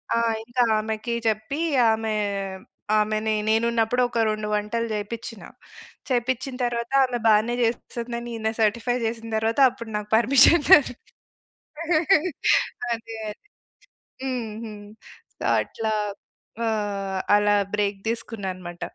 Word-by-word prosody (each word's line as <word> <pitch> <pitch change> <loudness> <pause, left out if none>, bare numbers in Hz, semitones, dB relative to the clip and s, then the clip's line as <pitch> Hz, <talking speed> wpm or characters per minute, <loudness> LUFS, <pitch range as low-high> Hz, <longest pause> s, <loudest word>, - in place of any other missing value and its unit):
ఆ! - - +2 0.3
ఇంకా 240 +2 +1
ఆమెకి 220 +2 -3
చెప్పి 250 +8 -1 0.3
ఆమె, 220 0 -1 0.9
ఆమెని 215 +1 0
నేనున్నపుడు 230 +2 +2
ఒక 235 - -2
2 215 0 -2
వంటలు 210 +3 -1
చేపిచ్చినా. 220 +1 -6 0.6
చేపిచ్చిన 255 +1 -1
తరువాత 235 0 -3
ఆమె 250 -1 -3
బానే 220 +2 +4
చేస్తందని 235 +1 -3
ఈయన 220 0 -1
సర్టిఫై 235 +3 +1
జేసిన 225 0 -4
తరవాత, 225 +4 0
అప్పుడు 235 -3 -9
నాకు 210 0 -6
పర్మిషన్ 270 +7 +5
దొ 375 - +11 2.2
అదే 225 0 -5
అదే. - - -5 1.0
హ్మ్. 250 -4 -3
హ్మ్. 210 -2 -9 0.5
సో, - - -9 0.2
అట్లా 220 -1 -3 0.7
ఆహ్, 200 -3 -2 0.2
అలా 205 0 +3 0.2
బ్రేక్ 205 -1 0
దీసుకున్నా 225 -3 -4
అనమాట. 175 -1 -10
225 Hz, 110 wpm, -24 LUFS, 215-235 Hz, 2.2 s, దొ